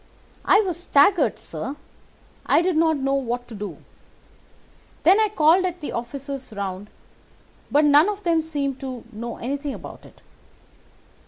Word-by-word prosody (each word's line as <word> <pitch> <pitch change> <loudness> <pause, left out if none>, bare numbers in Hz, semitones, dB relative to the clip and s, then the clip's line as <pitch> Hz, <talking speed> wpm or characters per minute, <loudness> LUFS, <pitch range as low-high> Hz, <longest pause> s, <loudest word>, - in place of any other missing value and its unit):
"I 415 - +6
was 360 -5 -3
staggered, 350 +2 +3
sir. 275 - -6 0.7
I - - +4
did 365 -1 +1
not 320 -1 +3
know 275 0 -1
what 245 -2 -2
to - - -9
do. 210 -1 -6 1.3
Then 375 +6 +6
I 435 -1 +3
called 340 -1 +4
at 360 -1 -3
the 300 - -5
offices 270 +2 -6
round, 200 0 -5 0.8
but 295 +2 +3
none 295 +6 +6
of 415 0 -5
them 335 -2 +2
seemed 285 -4 -3
to 260 -3 -6
know 235 +2 -6
anything 280 +3 -4
about - - -11
it. - - -22
285 Hz, 150 wpm, -23 LUFS, 250-335 Hz, 1.3 s, I